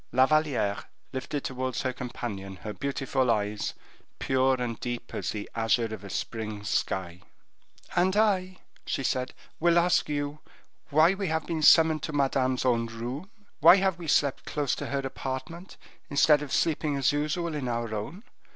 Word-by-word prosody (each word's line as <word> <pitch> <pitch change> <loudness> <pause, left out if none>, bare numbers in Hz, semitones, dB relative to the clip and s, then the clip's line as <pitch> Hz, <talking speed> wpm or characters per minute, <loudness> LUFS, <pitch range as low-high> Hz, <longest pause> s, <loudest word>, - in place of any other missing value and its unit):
La 130 +2 +5
Valliere 140 -9 +1 0.3
lifted 135 +2 -3
towards 130 -1 -3
her 130 - -1
companion 105 -6 -6
her 105 +4 -7
beautiful 135 +1 -1
eyes, 105 -1 -1 0.4
pure 130 0 +2
and 120 -2 -3
deep 120 -1 -5
as - - -3
the 105 -1 -4
azure 115 0 +1
of 105 -2 -8
a 100 - -8
spring 110 0 -4
sky, 95 -4 -2 0.7
"And 185 +3 +2
I," 185 -4 +2 0.3
she 135 - -2
said, 130 0 -1 0.2
"will 170 +1 +4
ask 175 -1 +3
you 145 0 -2 0.5
why 155 +5 +5
we 195 0 -3
have 160 -1 -1
been 165 -2 -2
summoned 160 0 +6
to 155 - -4
Madame's 130 -2 +1
own 115 -2 +2
room? 120 - -6 0.3
Why 165 +3 +9
have 190 -2 +1
we 170 - -7
slept 140 -2 +2
close 145 -3 -1
to - - -4
her 140 0 -1
apartment, 140 +8 -6 0.3
instead 145 +1 +5
of 145 -2 -6
sleeping 155 -2 +1
as 135 0 +2
usual 155 +3 -1
in 145 -4 -3
our 115 -2 -2
own? 135 - -5
135 Hz, 165 wpm, -28 LUFS, 120-155 Hz, 0.7 s, Why